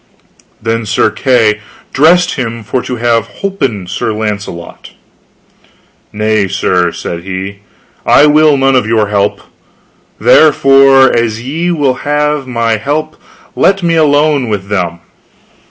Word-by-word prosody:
Then 115 0 -3
Sir 110 - +1
Kay 115 -5 +1 0.3
dressed 175 +5 +3
him 115 -3 -5
for 125 +4 -2
to 125 - -5
have 115 -1 0 0.2
holpen 130 - -2
Sir 100 - -3
Launcelot. 105 -5 -6 1.2
Nay, 105 -1 0
sir, 90 -2 0
said 85 0 -6
he, 95 +2 -6 0.4
I 145 - +5
will 150 -1 +4
none 135 0 +2
of 125 -4 +1
your 110 -2 +1
help, 100 0 -1 0.8
therefore 135 -3 +4
as 115 -1 -1
ye 160 +7 -3
will 145 -7 0
have 150 -1 -1
my 115 -2 -1
help 150 +7 -3 0.4
let 195 -1 +1
me 170 -1 +1
alone 145 -4 +2
with 100 -2 -4
them. 85 -4 -2
120 Hz, 125 wpm, -11 LUFS, 105-145 Hz, 1.2 s, I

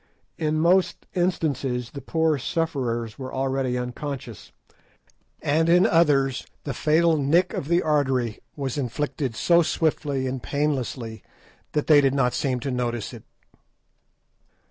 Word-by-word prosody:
In 155 -1 0
most 180 +3 +2
instances 140 -9 -1
the 140 - -7
poor 160 +1 +1
sufferers 125 -7 -2
were 130 -1 -6
already 130 -1 -1
unconscious, 125 -2 -6 0.9
and 160 +3 +2
in 175 +2 +6
others 140 -6 +2 0.2
the 140 - -3
fatal 160 +4 +3
"nick" 165 +6 +2
of 140 - -4
the 170 +2 +2
artery 135 -7 +1 0.2
was 140 -1 -3
inflicted 135 0 -2
so 170 +6 +4
swiftly 150 -5 0
and 130 -1 -3
painlessly 130 -7 -2 0.5
that 150 - 0
they 150 -2 +6
did 135 -1 +2
not 125 -3 +2
seem 130 -3 -1
to 135 - -3
notice 120 -3 -2
it. - - -11
140 Hz, 130 wpm, -24 LUFS, 125-155 Hz, 0.9 s, in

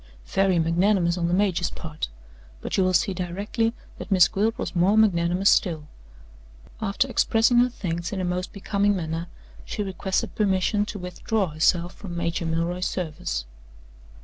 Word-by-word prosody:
Very 195 - +2
magnanimous 170 +2 +2
on 170 -2 -1
the 175 - 0
major's 185 -3 +1
part; 155 -1 -6 0.5
but - - -4
you 190 - +3
will 185 - +2
see 195 - +2
directly 200 +6 -1 0.3
that 180 - -7
Miss 180 -4 +6
Gwilt 215 +6 0
was - - -4
more 185 +5 +3
magnanimous 185 -2 +3
still. 160 -5 +1 0.9
After 220 +5 0
expressing 240 -1 +3
her 245 +1 +4
thanks 170 -7 -4
in 200 - -3
a 185 - -1
most 180 +1 -2
becoming 200 0 0
manner, 165 -1 -3 0.4
she 210 - -4
requested 190 0 -2
permission 205 +1 +1
to 210 - -5
withdraw 185 +2 -2
herself 170 +3 +1
from 175 -4 -8
Major 170 0 -1
Milroy's 170 +2 -1
service. 175 - -3
185 Hz, 155 wpm, -25 LUFS, 170-200 Hz, 0.9 s, Miss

